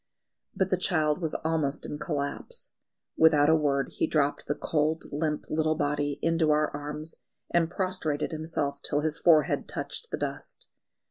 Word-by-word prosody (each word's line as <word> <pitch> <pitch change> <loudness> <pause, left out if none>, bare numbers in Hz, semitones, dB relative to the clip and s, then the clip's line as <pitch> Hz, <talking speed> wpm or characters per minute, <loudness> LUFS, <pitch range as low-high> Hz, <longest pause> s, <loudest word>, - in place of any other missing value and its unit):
But 190 -1 0
the 185 - +3
child 155 -3 +1
was 160 -2 -1
almost 155 -3 0
in 150 - -5
collapse. 150 - -4 0.4
Without 155 -2 +6
a 160 - +6
word 140 -3 +1
he - - -1
dropped 145 -2 +1
the 145 - 0
cold, 155 +1 0
limp 150 +1 -1
little 155 0 +1
body 145 -1 0
into 165 -1 +2
our 150 0 +3
arms, 150 +2 -5 0.3
and 165 -1 +3
prostrated 175 -5 -1
himself 155 -3 -2
till 145 - 0
his 155 +1 -1
forehead 160 -3 +4
touched 470 - -4
the - - -2
dust. - - -4
155 Hz, 155 wpm, -28 LUFS, 145-160 Hz, 0.4 s, Without